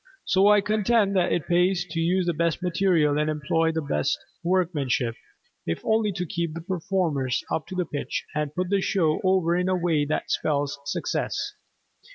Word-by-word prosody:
So 190 Hz, +2 st, +4 dB
I 210 Hz, 0 st, +6 dB
contend 210 Hz, 0 st, +2 dB
that 180 Hz, -2 st, +2 dB
it 165 Hz, -, 0 dB
pays 180 Hz, +1 st, +2 dB
to 165 Hz, -, -2 dB
use 180 Hz, +2 st, +1 dB
the 175 Hz, -, +1 dB
best 170 Hz, +2 st, -1 dB
material 170 Hz, -5 st, +2 dB
and 150 Hz, 0 st, +1 dB
employ 160 Hz, +2 st, +1 dB
the 160 Hz, -1 st, -2 dB
best 75 Hz, -, 0 dB, 0.3 s
workmanship, 155 Hz, -10 st, 0 dB, 0.5 s
if 85 Hz, -, -1 dB
only 220 Hz, -1 st, +2 dB
to 180 Hz, 0 st, -3 dB
keep 170 Hz, -1 st, -3 dB
the 165 Hz, -, -5 dB
performers 165 Hz, -7 st, -1 dB
up 155 Hz, -, -2 dB
to 185 Hz, -1 st, -2 dB
pitch 150 Hz, -2 st, -4 dB
and 150 Hz, -1 st, -2 dB
put 180 Hz, +1 st, -2 dB
the 200 Hz, -1 st, +2 dB
show 160 Hz, -6 st, +1 dB
over 185 Hz, -3 st, +2 dB
in 180 Hz, +1 st, 0 dB
a 185 Hz, -, +2 dB
way 170 Hz, -4 st, +1 dB
that 155 Hz, -, -2 dB
spells 145 Hz, -2 st, 0 dB
success. 145 Hz, -, -2 dB
170 Hz, 180 wpm, -25 LUFS, 150-185 Hz, 0.5 s, I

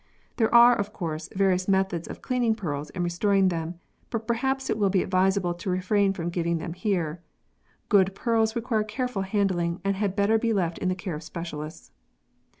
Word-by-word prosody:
There 225 Hz, -2 st, +2 dB
are, 240 Hz, +1 st, +8 dB
of 205 Hz, 0 st, -3 dB
course, 160 Hz, -3 st, -4 dB
various 185 Hz, -1 st, +2 dB
methods 190 Hz, -3 st, +1 dB
of -, -, -9 dB
cleaning 245 Hz, -3 st, +1 dB
pearls 150 Hz, -8 st, -4 dB
and 180 Hz, -, -3 dB
restoring 190 Hz, +2 st, +2 dB
them, 165 Hz, 0 st, -3 dB, 0.3 s
but 225 Hz, -2 st, -3 dB
perhaps 265 Hz, +4 st, -1 dB
it 215 Hz, -, -1 dB
will 200 Hz, -2 st, +3 dB
be 190 Hz, -1 st, +2 dB
advisable 185 Hz, -1 st, +1 dB
to 175 Hz, +2 st, -6 dB
refrain 195 Hz, +2 st, +2 dB
from 175 Hz, -2 st, -4 dB
giving 170 Hz, -1 st, 0 dB
them 165 Hz, +1 st, -5 dB
here. 175 Hz, -4 st, -2 dB, 0.7 s
Good 195 Hz, -1 st, +3 dB
pearls 225 Hz, -1 st, +1 dB
require 230 Hz, -2 st, 0 dB
careful 215 Hz, 0 st, -3 dB
handling 190 Hz, -3 st, 0 dB
and 195 Hz, 0 st, +1 dB
had 195 Hz, -1 st, -1 dB
better 210 Hz, +2 st, +3 dB
be 230 Hz, 0 st, +1 dB
left 175 Hz, -5 st, -1 dB
in 185 Hz, -, 0 dB
the 185 Hz, -, 0 dB
care 185 Hz, -1 st, -5 dB
of 150 Hz, -, -5 dB
specialists. 155 Hz, -2 st, -7 dB
190 Hz, 185 wpm, -26 LUFS, 175-215 Hz, 0.7 s, are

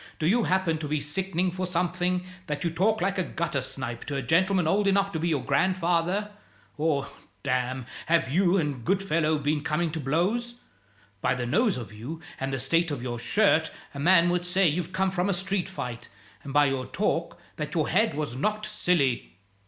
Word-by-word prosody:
Do 155 Hz, -, -2 dB
you 220 Hz, +7 st, +3 dB
happen 185 Hz, -4 st, +1 dB
to 155 Hz, -, -4 dB
be 150 Hz, +1 st, 0 dB
sickening 180 Hz, +4 st, -1 dB
for 185 Hz, +1 st, -3 dB
something, 180 Hz, +1 st, 0 dB, 0.2 s
that 150 Hz, -1 st, -3 dB
you 170 Hz, -, 0 dB
talk 205 Hz, +7 st, +1 dB
like 195 Hz, +1 st, 0 dB
a -, -, +2 dB
gutter 165 Hz, -5 st, -2 dB
snipe 125 Hz, -2 st, -5 dB
to 145 Hz, -, -4 dB
a 135 Hz, -, -2 dB
gentleman 180 Hz, +4 st, +3 dB
old 200 Hz, +4 st, +2 dB
enough 195 Hz, 0 st, +3 dB
to 160 Hz, -, -2 dB
be 170 Hz, -, 0 dB
your 150 Hz, -6 st, 0 dB
grandfather? 180 Hz, +6 st, +1 dB, 0.4 s
Or, 150 Hz, -3 st, 0 dB, 0.4 s
damme, 130 Hz, 0 st, -1 dB, 0.2 s
have 165 Hz, -4 st, +3 dB
you 175 Hz, +6 st, +3 dB
and 145 Hz, -8 st, -1 dB
Goodfellow 165 Hz, -2 st, +1 dB
been 145 Hz, +1 st, 0 dB
coming 160 Hz, +2 st, 0 dB
to 160 Hz, -, -4 dB
blows? 190 Hz, -, 0 dB, 0.7 s
By -, -, +2 dB
the 125 Hz, -1 st, -2 dB
nose 200 Hz, -, +2 dB
of 110 Hz, -4 st, -7 dB
you 125 Hz, +10 st, -7 dB, 0.2 s
and 135 Hz, 0 st, -2 dB
the 135 Hz, -, -2 dB
state 165 Hz, +6 st, +1 dB
of 140 Hz, -5 st, -4 dB
your 120 Hz, -2 st, -3 dB
shirt 160 Hz, -, +3 dB, 0.2 s
a 140 Hz, -, -7 dB
man 170 Hz, +2 st, +5 dB
would 175 Hz, 0 st, 0 dB
say 180 Hz, +1 st, +2 dB
you've 170 Hz, +3 st, -1 dB
come 190 Hz, 0 st, +1 dB
from 185 Hz, +1 st, 0 dB
a -, -, +2 dB
street 190 Hz, +1 st, -2 dB
fight; 125 Hz, -11 st, -6 dB, 0.3 s
and 140 Hz, -, -8 dB
by 145 Hz, +1 st, +5 dB
your 135 Hz, -2 st, -1 dB
talk, 170 Hz, -2 st, -1 dB, 0.2 s
that 150 Hz, +1 st, -4 dB
your 155 Hz, -3 st, +2 dB
head 205 Hz, -1 st, +2 dB
was 145 Hz, -5 st, -3 dB
knocked 215 Hz, +10 st, -1 dB
silly." 170 Hz, -, 0 dB
165 Hz, 200 wpm, -27 LUFS, 145-185 Hz, 0.7 s, man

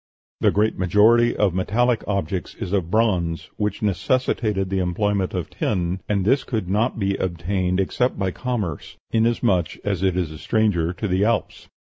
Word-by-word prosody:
The -, -, +4 dB
great 105 Hz, +2 st, +1 dB
majority 110 Hz, +6 st, +4 dB
of 100 Hz, -4 st, +2 dB
metallic 115 Hz, +6 st, +1 dB
objects 95 Hz, -2 st, -2 dB
is 95 Hz, -, -5 dB
of 90 Hz, -5 st, 0 dB
bronze, 90 Hz, -6 st, 0 dB
which 105 Hz, 0 st, -2 dB
necessitated 105 Hz, -1 st, 0 dB
the 95 Hz, -, +1 dB
employment 95 Hz, +2 st, 0 dB
of 90 Hz, -4 st, -4 dB
tin, 90 Hz, -2 st, -1 dB
and 100 Hz, -3 st, +1 dB
this 130 Hz, +5 st, +3 dB
could 110 Hz, -7 st, -3 dB
not 110 Hz, +7 st, 0 dB
be 100 Hz, -2 st, 0 dB
obtained 90 Hz, +1 st, -1 dB
except 125 Hz, +6 st, 0 dB
by 95 Hz, -1 st, -1 dB
commerce, 105 Hz, -, -4 dB
inasmuch 115 Hz, -6 st, +1 dB
as 100 Hz, -4 st, -1 dB
it 95 Hz, -2 st, +1 dB
is 85 Hz, -4 st, -1 dB
a 80 Hz, -, -9 dB
stranger 105 Hz, -7 st, +1 dB
to 105 Hz, -, -3 dB
the 95 Hz, +1 st, +1 dB
Alps. 115 Hz, 0 st, -1 dB
100 Hz, 165 wpm, -22 LUFS, 90-110 Hz, -, The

